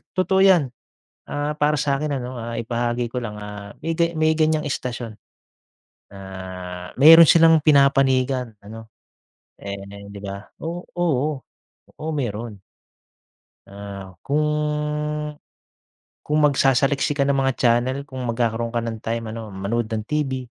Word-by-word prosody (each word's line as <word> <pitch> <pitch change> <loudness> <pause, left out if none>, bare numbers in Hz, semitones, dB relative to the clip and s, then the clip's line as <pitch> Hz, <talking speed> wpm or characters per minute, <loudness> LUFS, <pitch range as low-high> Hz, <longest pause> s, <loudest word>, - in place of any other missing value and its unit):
totoo 190 +1 +2
yan. 185 -6 +6 0.7
Ah, 145 +1 -2
para 150 +1 +2
sa'kin 145 +1 0
ano, 125 -1 -5
ah, 115 0 -5
ibahagi 120 +1 -2
ko 125 - -3
lang, 105 -3 -6
ah, 105 0 -8
may 165 - 0
gay 170 0 +2
may 155 0 +3
ganyang 155 -1 +2
istasyon 120 -5 -4 1.0
na 100 - -11 0.8
meron 165 +2 +10
silang 165 -1 +7
pinapanigan 135 -4 +3
ano. 110 +2 -10 0.7
Eh, 100 0 -8
di 100 -1 -9
ba 100 0 -5 0.2
o 175 +2 -5
oo, 150 -5 0 0.6
oo 155 - -4
meron. 115 -4 -4 1.1
Ah, 100 -2 -9
kung 150 0 -1 0.9
kung 150 +1 0
magsasaliksik 140 0 +2
ka 140 - +3
ng 140 - +2
mga 135 0 +2
channel 120 +2 +2
kung 130 -1 -7
magkakaroon 115 -1 -1
ka - - +2
ng 115 -1 -4
time 115 -1 -3
ano, 110 -2 -7
manood 110 +4 -2
ng 110 -1 -3
TV. 135 -4 -1
130 Hz, 130 wpm, -22 LUFS, 115-150 Hz, 1.1 s, meron